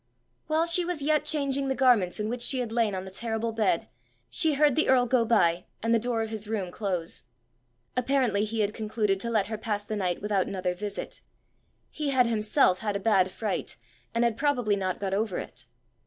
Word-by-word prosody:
While 320 +1 +2
she 340 +1 +3
was 345 -4 -3
yet 305 +1 +2
changing 280 -2 0
the 265 - 0
garments 240 -9 +3
in 210 - -1
which 240 +2 -3
she 265 - +3
had 245 -3 -2
lain 225 -4 +1
on 185 0 -4
the 190 - -9
terrible 225 +2 -2
bed, 215 -6 0 0.4
she 320 -4 +2
heard 290 -2 +4
the 315 - +2
earl 255 -2 +5
go 245 -1 +2
by, 180 -7 +2 0.2
and 230 0 +2
the 230 - +4
door 235 -1 -1
of 220 - -6
his 215 -1 -4
room 200 -5 -3
close. 180 -7 -3 0.7
Apparently 250 -5 +1
he 220 +1 -1
had 210 0 0
concluded 215 -3 -1
to 235 - -3
let 215 -4 +2
her 220 0 -5
pass 210 -2 -2
the 215 - -4
night 180 -4 -1
without 205 -2 0
another 185 -2 -2
visit: 205 +3 -6 0.7
he 300 -2 -3
had 260 -2 +4
himself 215 -3 +2
had 210 -2 -2
a - - 0
bad 195 -3 +3
fright, 210 - -3 0.4
and 230 - +2
had 235 -2 +1
probably 245 -7 +1
not 185 -2 -2
got 195 -1 -2
over 205 -2 -1
it. - - -8
220 Hz, 210 wpm, -27 LUFS, 200-250 Hz, 0.7 s, earl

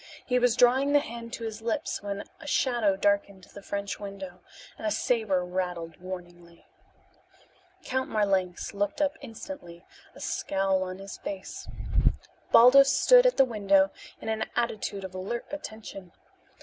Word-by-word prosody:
He 250 -1 +2
was 245 -1 +3
drawing 260 +4 +4
the 290 - +7
hand 235 -4 -7
to 230 - -5
his 220 -1 -5
lips 285 +7 -2
when 200 0 -4 0.2
a 295 - -11
shadow 240 -8 +2
darkened 200 -1 0
the 200 - -10
French 200 0 -4
window, 195 -3 -8 0.4
and 220 - -4
a - - +3
saber 210 -6 +1
rattled 180 -2 -3
warningly. 175 -2 -9 1.2
Count 260 0 -1
Marlanx 195 -4 0
looked 205 +3 -1
up 295 0 +1
instantly, 225 - -9 0.3
a - - -12
scowl 195 -1 0
on 185 0 -4
his 195 0 -9
face. 195 -2 -7 0.8
Baldos 275 +4 +8
stood - - +6
at - - +1
the 270 - +7
window 200 -4 +3 0.3
in - - -9
an 220 0 -1
attitude 215 -4 -2
of 190 -1 -7
alert 190 +6 -4
attention. 220 - -8
205 Hz, 150 wpm, -28 LUFS, 190-240 Hz, 1.2 s, Baldos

